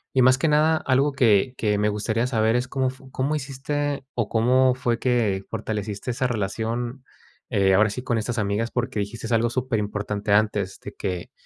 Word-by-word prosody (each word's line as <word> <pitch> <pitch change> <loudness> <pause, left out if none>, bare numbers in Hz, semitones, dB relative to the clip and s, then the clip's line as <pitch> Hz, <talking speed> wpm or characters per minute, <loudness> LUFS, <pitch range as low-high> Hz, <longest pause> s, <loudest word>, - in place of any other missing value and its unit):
y, 130 - +5
más 130 +1 +6
que 150 - +1
nada, 155 +2 +4
algo 135 0 +1
que 125 -1 +3
que 105 -2 +1
me 105 +1 +1
gustaría 110 +3 -1
saber 110 -2 +2
es, 125 +1 -2
¿cómo 130 0 0
fu 130 0 -16
cómo 135 +4 -1
hiciste, 145 0 -3
o 120 -3 0
cómo 125 +3 +3
fue 120 -2 -1
que 115 -7 +1
fortaleciste 110 +2 -4
esa 130 - +1
relación, 115 +4 -3 0.4
eh, 95 -1 +3
ahora 110 +3 +4
sí, 125 +4 -5
con 120 -3 0
estas 115 +2 -2
amigas? 105 +3 -1
Porque, 120 -2 -2
dijiste 115 +3 -3
algo 115 +1 +2
súper 125 -2 -1
importante 105 0 -2
antes, 105 -2 +1
de - - -8
que 90 -2 -4
120 Hz, 190 wpm, -24 LUFS, 105-130 Hz, 0.4 s, más